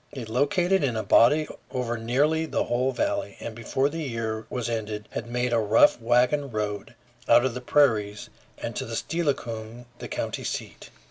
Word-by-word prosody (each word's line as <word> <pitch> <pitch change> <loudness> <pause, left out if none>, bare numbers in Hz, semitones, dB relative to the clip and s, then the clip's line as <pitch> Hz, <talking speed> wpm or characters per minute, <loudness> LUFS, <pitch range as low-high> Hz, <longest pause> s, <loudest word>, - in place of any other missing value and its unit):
They 130 -4 -6
located 175 - +1
in 125 -5 0
a 110 - -1
body 145 +9 +5 0.2
over 125 -2 -2
nearly 145 +8 +1
the - - 0
whole 125 +2 0
valley, 300 - -2
and 115 - -6
before 120 +4 0
the 165 +3 -4
year 115 -5 -3
was 125 -2 -3
ended 110 -2 -4
had 115 - -5
made 125 0 -1
a 115 - +4
rough 110 +2 +4
wagon 125 +5 +2
road 105 0 -4 0.3
out 120 +1 +7
to 130 - +2
the 125 +1 -6
prairies 110 -7 +2 0.3
and - - -5
to - - -2
Steilacoom, 120 -8 -3
the - - -6
county - - -4
seat. - - -5
120 Hz, 175 wpm, -26 LUFS, 110-145 Hz, 0.3 s, out